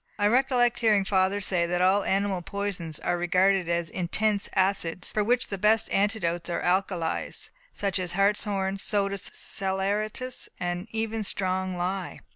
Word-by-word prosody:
I 205 - +1
recollect 245 +1 +3
hearing 210 -4 +3
father 190 +1 +2
say 175 -3 0
that 175 +1 -1
all 190 +3 +4
animal 195 -1 0
poisons 180 -4 -4
are 175 - 0
regarded 185 +1 +2
as 170 -1 0
intense 200 +3 0
acids, 185 -2 +1
for 210 - +1
which 245 +4 +1
the 200 - -4
best 220 +2 +3
antidotes 190 -4 0
are 170 - -2
alkalies, 180 -2 0 0.2
such 200 -1 -1
as 180 -1 -3
hartshorn, 195 0 +1
soda 200 -1 0
saleratus, 205 +8 -2
and 175 +2 -3
even 225 0 -2
strong 185 -2 -2
lye." 185 +1 -3
195 Hz, 145 wpm, -27 LUFS, 180-210 Hz, 0.2 s, all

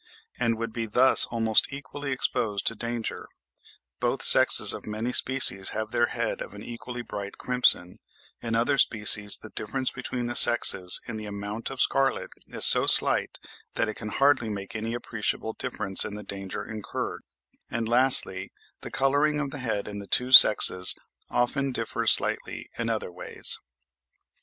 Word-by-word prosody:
and 115 -2 -2
would 115 -1 -7
be 115 -1 -6
thus 125 +5 +3
almost 115 -2 -1
equally 140 0 -9
exposed 105 -5 -3
to - - 0
danger; 115 0 -7 0.7
both - - -4
sexes - - +4
of - - -11
many 110 +4 -6
species 130 -8 +3
have 110 0 -6
their 120 0 -1
heads - - -6
of - - -10
an - - -12
equally 120 +1 -10
bright 100 -3 -10
crimson; 125 -8 +3 0.4
in 115 -1 -5
other 130 +5 -1
species 105 -3 +4
the 110 - -15
difference 130 +5 -5
between 125 -1 -7
the 120 0 -6
sexes 95 -6 +4
in 115 -3 -8
the 110 -1 -9
amount 105 +2 -8
of 135 -1 -11
scarlet 135 +1 -1 0.2
is - - +4
so - - +6
slight - - +5 0.4
that - - -2
it 110 - -6
can 110 -1 -10
hardly 135 -1 -1
make 100 0 -9
any 115 +2 -6
appreciable 110 -1 -5
difference 95 0 -2
in 105 - -8
the 105 - -10
danger 100 -2 -9
incurred; 110 -2 -8 0.5
and 115 -1 -5
lastly, 120 -6 +1 0.3
the - - -11
colouring 145 +3 -1
of 140 -2 -6
the 145 - -8
head 110 -5 -5
in 100 -1 -9
the 100 - -12
two 125 +5 -1
sexes 90 -6 +7 0.3
often 135 +3 -3
differs - - -3
slightly - - +1
in 115 -1 -5
other 110 -5 -5
ways. 90 - -2
115 Hz, 165 wpm, -24 LUFS, 105-130 Hz, 0.7 s, sexes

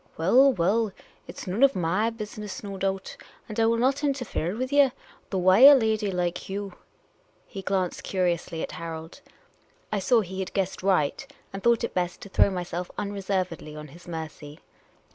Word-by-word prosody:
" - - -30
Well, 250 +12 +5
well, 205 +4 +1 0.4
it - - -10
's - - -7
none 190 +6 -2
of 275 0 +6
my 185 +6 +1
business, 215 -3 -7
no 200 -1 -6
doul)t, 195 0 -2 0.3
and 215 0 -5
I 225 - +4
will 230 0 +2
not 265 +5 +1
interfere 250 - -1
with 255 +4 -3
ye; 285 -2 +6 0.4
though 195 - -2
why 185 +2 +5
a 280 +3 +11
lady 220 -4 +1
like 180 -1 -2
you 200 -1 -4 0.4
" - - -38
He 195 - -5
glanced 190 -2 -1
curiously 175 -3 -1
at - - -5
Harold. 165 0 -7 0.7
I 210 - 0
saw 225 +5 +3
he 190 -1 -6
had 190 - -4
guessed 190 -1 -1
right, 190 - 0 0.2
and 195 - -5
thought 235 +1 +3
it 235 - -2
best 180 -1 -2
to 200 - -9
throw 195 - +4
myself 180 -1 -4
unreservedly 190 -6 -3
on 150 -1 -9
his 170 +6 -15
mercy. 155 -3 -7
195 Hz, 185 wpm, -26 LUFS, 175-225 Hz, 0.7 s, a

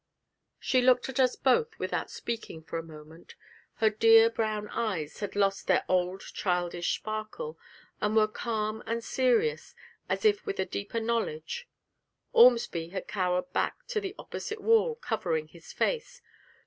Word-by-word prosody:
She 255 - +2
looked 250 +1 +4
at 265 - -4
us 255 -1 +4
both 450 - +2
without - - -2
speaking 230 -9 -6
for 165 - -4
a - - -6
moment; 160 +1 -13 0.4
her 220 -1 +3
dear 225 +1 +6
brown 215 -2 -2
eyes 180 -10 -3
had 205 -1 -4
lost 195 -1 +1
their - - +3
old 185 +1 +1
childish 175 -2 -1
sparkle, 215 - -5 0.4
and 210 +1 +1
were 215 -1 +5
calm 215 -1 -3
and 230 +1 -2
serious 260 - +1 0.3
as - - -1
if 415 -2 +4
with 400 -2 -4
a - - +1
deeper 200 +4 -4
knowledge. 230 - -2 0.7
Ormsby 230 -9 +5
had 190 +1 -5
cowered 180 +3 -1
back - - -1
to 435 -4 -1
the 390 0 -5
opposite 435 - -6
wall, 455 +2 +3
covering 180 - -2
his 165 0 -13
face. - - -2
220 Hz, 150 wpm, -29 LUFS, 185-260 Hz, 0.7 s, dear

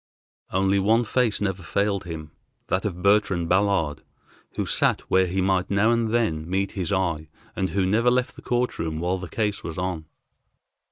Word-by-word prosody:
Only 95 +1 +2
one 110 +5 +3
face 115 -1 +1
never 95 -2 -1
failed 100 +4 -1
him, 80 -3 -7 0.4
that 95 +2 0
of 90 -3 -4
Bertrand 100 -4 +3
Ballard, 95 -6 +1 0.5
who - - -1
sat - - +2
where 95 0 +4
he 95 +2 -1
might 95 -1 +1
now 100 +3 +3
and 115 -2 +1
then 85 -9 0
meet 95 +1 0
his 90 -5 -3
eye, 85 -5 -1 0.3
and 95 - -1
who 95 +2 0
never 110 +6 +3
left 125 +1 0
the - - -12
court 125 0 -1
room 80 -1 -2
while 90 +3 -1
the 90 -2 -7
case 105 -3 -2
was 80 - -6
on. 90 -3 -3
95 Hz, 180 wpm, -24 LUFS, 85-105 Hz, 0.5 s, where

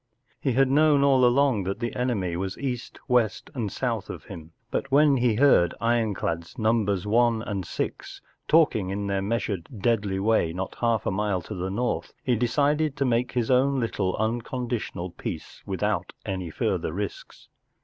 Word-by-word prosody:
He 135 - 0
had 135 +2 +4
known 145 +1 +4
all 135 -2 +4
along 125 -2 +4
that 100 +4 -3
the 120 -1 -3
enemy 105 -9 -1
was 95 +2 -3
east, 130 -3 -4
west, 125 -5 +1
and 115 -8 -3
south 115 -6 -2
of - - -7
him, 80 0 -10 0.2
but 135 - -2
when 140 0 +5
he 120 -3 +2
heard 120 -9 +4
war 115 +2 0
ironclads 100 -8 -1
Num¬ 110 -3 +1
bers 100 -2 -1
One 115 +1 +2
and 100 -4 -3
Six - - -4 0.3
talking 145 - +3
in 100 +1 -3
their 100 -1 0
measured, 100 -4 -2
deadly 100 -3 +1
way 100 -5 +2
not 95 +2 -5
half 115 -3 +1
a - - +1
mile 100 -2 -1
to 105 - -7
the 95 -1 -3
north 120 +6 -2
he 125 - +2
decided 145 +5 +1
to 140 - +1
make 120 0 +1
his 120 -1 0
own 135 +2 +3
little 100 -6 -1
unconditional 115 -4 -3
peace 85 -2 -7
without - - -1
any 95 -3 -3
further 80 - -1
risks. 100 +4 -6
115 Hz, 175 wpm, -26 LUFS, 95-125 Hz, 0.3 s, when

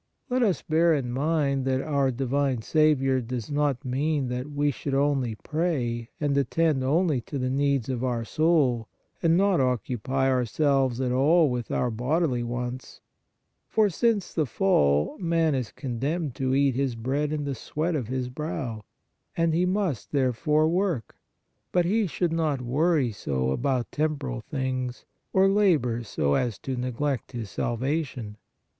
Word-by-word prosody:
Let 255 +1 +2
us 195 - +1
bear 165 +1 +3
in 125 -4 -2
mind 140 0 0
that 130 0 +1
our 140 -1 +1
di 130 +1 -2
vine 135 -2 0
Saviour 135 -3 +3
does 120 +1 -5
not 145 -2 0
mean 140 +1 0
that 125 +3 -4
we 145 0 +1
should 135 0 -3
only 135 -5 +1
pray 125 -6 -2
and 145 -2 0
attend 140 +1 +1
only 150 0 +2
to 140 - -6
the 130 -1 -1
needs 140 -3 +1
of 130 -2 -2
our 120 -3 -1
soul, 140 -6 +2 0.3
and 165 0 +4
not 195 -2 +3
occupy 130 +1 0
ourselves 130 0 +1
at 130 -2 0
all 150 +4 +4
with 120 -2 -3
our 125 - 0
bodily 130 +3 0
wants, 125 +1 -5 0.7
for, 215 -2 +2
since 220 0 0
the 155 -4 0
fall, 75 - +2
man 165 -3 +1
is 130 -4 -2
condemned 140 +4 -3
to 130 +1 0
eat 140 -1 +3
his 130 -1 -1
bread 135 +6 -1
in 150 -1 -2
the 140 -1 -2
sweat 155 +7 -2
of 130 -7 -2
his 130 0 -2
brow, 125 -5 -4 0.5
and 165 -1 +2
he 175 +3 +2
must, 185 - -1
there 130 -3 +2
fore, 155 +5 +2
work; 170 - -1 0.6
but 180 -1 +2
he 210 +3 +2
should 170 0 -1
not 155 -4 0
worry 140 +1 +1
so 65 -9 -2
about 125 - -1
tem 155 0 0
poral 130 -5 -5
things 130 -2 -3 0.3
or 190 0 +4
labor 170 - +2
so 75 -10 -1
as 120 - 0
to 130 - -4
neglect 125 +1 -2
his 115 -5 -5
salvation. 125 -3 -2
135 Hz, 165 wpm, -26 LUFS, 125-155 Hz, 0.7 s, and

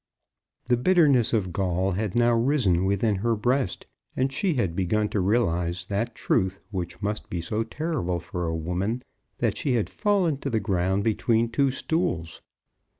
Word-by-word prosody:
The 125 -1 +2
bitterness 145 -5 +4
of 95 -6 0
gall 95 +1 0
had 100 +1 -2
now 120 0 +4
risen 115 - +2
within 100 +1 +1
her 115 +4 +1
breast, 125 -1 0 0.3
and 135 +1 +1
she 175 +3 0
had 95 -10 0
begun 105 +3 +1
to 105 - -1
realize 90 -4 +1
that 110 +5 -2
truth 95 +1 0
which 90 +1 -5
must 105 +1 -3
be 85 - -3
so 105 +6 -2
terrible 115 - -2
for 85 +1 -4
a 80 - -1
woman, 90 +9 -2 0.3
that 110 -3 0
she 135 +2 0
had 115 -4 0
fallen 195 -8 +1
to 140 - -3
the 115 -3 +1
ground 95 -1 0
between 115 +1 +1
two 140 +3 +2
stools. 130 - -2
105 Hz, 165 wpm, -26 LUFS, 90-125 Hz, 0.3 s, bitterness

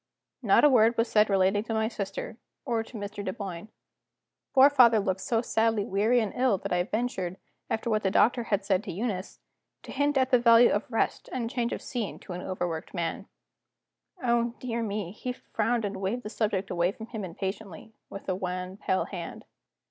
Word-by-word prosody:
Not - - +4
a 295 - +8
word 230 -1 +4
was 230 +1 +2
said 210 0 +4
relating 195 +1 +2
to 225 - -2
my 220 0 +1
sister, 215 0 -5 0.3
or 235 -4 0
to 225 +1 -9
Mr. 205 0 -6
Dunboyne. 190 -2 -5 0.9
Poor 265 +1 +9
father 250 -6 +6
looked 190 -2 -1
so 230 +2 0
sadly 225 -3 +1
weary 215 +6 +2
and 215 -4 -2
ill 250 -5 +2
that 180 - -4
I 180 - +2
ventured, 190 -3 -2 0.3
after 220 - -2
what 215 0 +2
the 195 - +1
doctor 240 +4 +3
had 200 -2 0
said 195 0 +1
to 195 - -4
Eunice, 195 0 -4 0.4
to - - -9
hint 285 +1 +1
at 260 -1 +2
the 250 - +6
value 235 0 +6
of 205 - -1
rest 225 - -1
and 235 -2 -3
change 240 -3 -1
of - - -4
scene 235 -5 -4
to 180 - -8
an 180 - -5
overworked 175 -2 -4
man. 170 -2 -3 1.0
Oh, 235 -1 +1
dear 235 -2 -3
me, 205 -5 -3
he 250 +5 -5
frowned, 230 -1 -1
and 200 -1 -4
waved 200 +6 -2
the 210 - -5
subject 200 -4 -1
away 175 +1 +1
from 220 - -9
him 220 -3 -6
impatiently, 190 +3 -6 0.2
with 195 - -9
a 190 - +1
wan, 185 0 -4
pale 190 -2 0
hand. 175 -4 -7
215 Hz, 195 wpm, -28 LUFS, 190-235 Hz, 1.0 s, Poor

